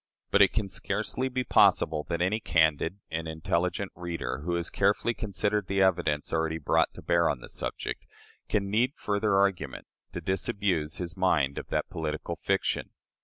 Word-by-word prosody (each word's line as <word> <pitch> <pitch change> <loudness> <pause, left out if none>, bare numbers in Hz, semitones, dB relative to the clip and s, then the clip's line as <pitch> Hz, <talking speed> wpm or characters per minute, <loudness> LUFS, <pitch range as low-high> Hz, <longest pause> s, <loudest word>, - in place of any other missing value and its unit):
But 100 - +5
it 100 - +7
can 110 -3 -1
scarcely 110 +7 -2
be 125 0 -1
possible 75 -9 +4
that 85 0 0
any 105 +5 +1
candid 80 -2 +2
and 80 0 -3
intelligent 85 +4 -1
reader, 85 -5 -4
who 85 +4 -2
has 85 0 -2
carefully 100 +4 +2
considered 105 -1 -1
the 95 0 +2
evidence 80 -6 +1
already 80 0 0
brought 75 - +2
to - - -10
bear 85 -1 +3
on 65 - -1
the - - -11
subject, - - -5 0.4
can 100 -1 0
need 120 +5 +2
further 100 -1 0
argument 95 -8 0 0.3
to - - -3
disabuse 90 -2 -1
his 85 -2 -4
mind 80 -8 +2
of - - -9
that - - -1
political 80 -2 -3
fiction. - - 0
90 Hz, 170 wpm, -28 LUFS, 80-100 Hz, 0.4 s, it